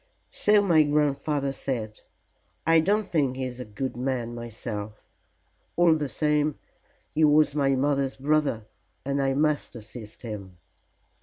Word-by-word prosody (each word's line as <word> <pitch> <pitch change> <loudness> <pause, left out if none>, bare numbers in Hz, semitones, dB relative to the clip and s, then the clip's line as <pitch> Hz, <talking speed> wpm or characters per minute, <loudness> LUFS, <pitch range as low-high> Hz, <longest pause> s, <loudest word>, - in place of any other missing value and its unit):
"So 210 -1 +4
my 170 -5 +5
grandfather 145 -1 +1
said. 115 -5 -4 0.6
I 165 0 +5
don't 205 +5 +1
think 140 -6 +1
he 130 - -3
is 125 -1 -6
a 125 - -5
good 110 +5 -4
man 125 -2 -2
myself. 110 -3 -6 0.7
All 175 -1 +5
the 150 -3 -1
same 150 +3 +1 0.6
he 155 - +2
was 150 -1 +5
my 140 -2 +2
mother's 140 0 0
brother, 140 -5 0 0.4
and 140 0 0
I 135 0 +1
must 150 -2 0
assist 110 0 -10
him." 100 -5 -7
140 Hz, 140 wpm, -26 LUFS, 120-150 Hz, 0.7 s, my